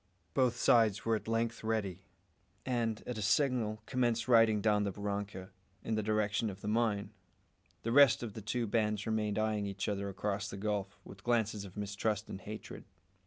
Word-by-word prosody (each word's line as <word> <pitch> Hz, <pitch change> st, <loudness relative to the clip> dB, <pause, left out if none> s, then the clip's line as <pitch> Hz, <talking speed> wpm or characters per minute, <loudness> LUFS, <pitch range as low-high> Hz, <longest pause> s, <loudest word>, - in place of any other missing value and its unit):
Both 130 Hz, -3 st, +2 dB
sides 110 Hz, -5 st, +4 dB
were 115 Hz, -1 st, +3 dB
at 110 Hz, -, -5 dB
length 115 Hz, 0 st, -1 dB
ready, 105 Hz, -5 st, -1 dB, 0.6 s
and, 115 Hz, -4 st, -1 dB
at 120 Hz, -3 st, -4 dB
a -, -, -3 dB
signal, 110 Hz, -2 st, +1 dB
commenced 120 Hz, -2 st, 0 dB
riding 115 Hz, -3 st, +5 dB
down 105 Hz, -1 st, +2 dB
the 100 Hz, -, -1 dB
barranca, 100 Hz, -1 st, -4 dB, 0.3 s
in 115 Hz, -, -2 dB
the 110 Hz, -, +1 dB
direction 105 Hz, +1 st, 0 dB
of 95 Hz, -1 st, -9 dB
the -, -, -6 dB
mine. 105 Hz, -2 st, +1 dB, 0.7 s
The 115 Hz, -, -1 dB
rest 140 Hz, -2 st, +6 dB
of 110 Hz, -4 st, -5 dB
the 110 Hz, -, -7 dB
two 115 Hz, +4 st, -1 dB
bands 105 Hz, -1 st, 0 dB
remained 110 Hz, -2 st, 0 dB
eyeing 110 Hz, -1 st, 0 dB
each 100 Hz, 0 st, -3 dB
other 100 Hz, -1 st, -2 dB
across 100 Hz, +1 st, -2 dB
the 100 Hz, -, -6 dB
gulf, 100 Hz, -1 st, -2 dB
with 100 Hz, 0 st, -13 dB
glances 110 Hz, -4 st, 0 dB
of 95 Hz, +1 st, -12 dB
mistrust 105 Hz, +1 st, -2 dB
and 95 Hz, -, -6 dB
hatred. 105 Hz, +1 st, -8 dB
105 Hz, 180 wpm, -33 LUFS, 100-115 Hz, 0.7 s, rest